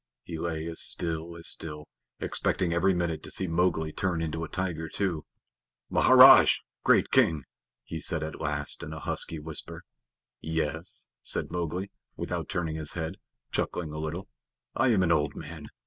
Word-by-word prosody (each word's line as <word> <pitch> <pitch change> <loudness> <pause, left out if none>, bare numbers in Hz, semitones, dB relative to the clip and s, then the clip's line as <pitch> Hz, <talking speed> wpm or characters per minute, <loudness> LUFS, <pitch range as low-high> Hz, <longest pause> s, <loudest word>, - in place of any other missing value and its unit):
He 80 -2 -6
lay 80 -2 -3
as 85 0 -3
still 85 0 0
as 85 - +3
still, 75 -2 +2 0.3
expecting 85 -2 0
every 95 +3 +3
minute 85 -2 -1
to - - -9
see 95 - -2
Mowgli 80 -2 0
turn 90 -3 -1
into 80 0 -3
a 80 - -6
tiger 85 -4 -3
too. 90 -5 -2 0.7
"Maharaj! - - +8 0.3
Great - - +4
King," 90 - +3 0.4
he 80 - -6
said 80 -1 -2
at 80 - -6
last - - -1
in - - -7
a - - -6
husky 80 - -3
whisper. 75 0 -8 0.6
"Yes," 80 +2 -4
said - - +1
Mowgli, 90 +3 -3 0.2
without - - -4
turning 80 -4 -2
his 80 -1 -3
head, 80 +2 -4 0.3
chuckling 80 -4 -2
a 75 - -5
little. 80 +5 -4 0.5
"I 130 - +2
am 105 -6 +3
an 85 - +2
old 75 -2 +1
man. 80 -1 -8
80 Hz, 165 wpm, -28 LUFS, 80-90 Hz, 0.7 s, Maharaj